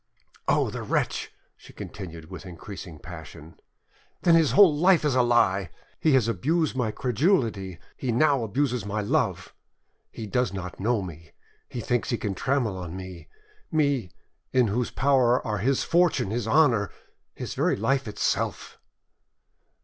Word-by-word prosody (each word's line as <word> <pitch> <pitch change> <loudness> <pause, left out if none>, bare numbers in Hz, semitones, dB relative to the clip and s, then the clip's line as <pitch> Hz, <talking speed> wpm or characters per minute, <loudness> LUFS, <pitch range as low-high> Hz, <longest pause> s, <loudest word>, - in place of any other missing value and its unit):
"Oh! - - +2
the - - -5
wretch," - - -1 0.2
she - - -16
continued, 85 -4 -9
with 95 - -8
increasing 90 -2 -9
passion; 80 -1 -11 0.6
"then 170 - +5
his 165 -3 +4
whole 190 -7 +7
life 175 +1 +4
is 145 - +2
a 130 - +4
lie! 100 -7 +2 0.3
He 155 - +3
has 130 -4 +4
abused 150 - 0
my 125 -4 0
credulity, 115 - 0 0.2
he 130 - -2
now 140 +1 +3
abuses 125 +1 -1
my 105 +1 -2
love! 100 - -1 0.6
He 110 - -7
does 115 -1 0
not 90 -2 -6
know 110 +1 +1
me! 85 -2 -10 0.4
He 120 - -5
thinks 120 +1 -1
he 120 - 0
can 105 -3 -3
trample 120 -1 0
on 90 0 -6
me—me, 95 - -3 0.4
in 125 -4 +3
whose 120 +4 -1
power 130 -3 +3
are 105 -3 -1
his 130 +6 +1
fortune, 170 - +2
his 115 -1 -2
honour, 115 - +3 0.5
his - - -5
very - - +1
life 135 +4 0
itself!" 105 - -2
115 Hz, 150 wpm, -26 LUFS, 95-135 Hz, 0.6 s, whole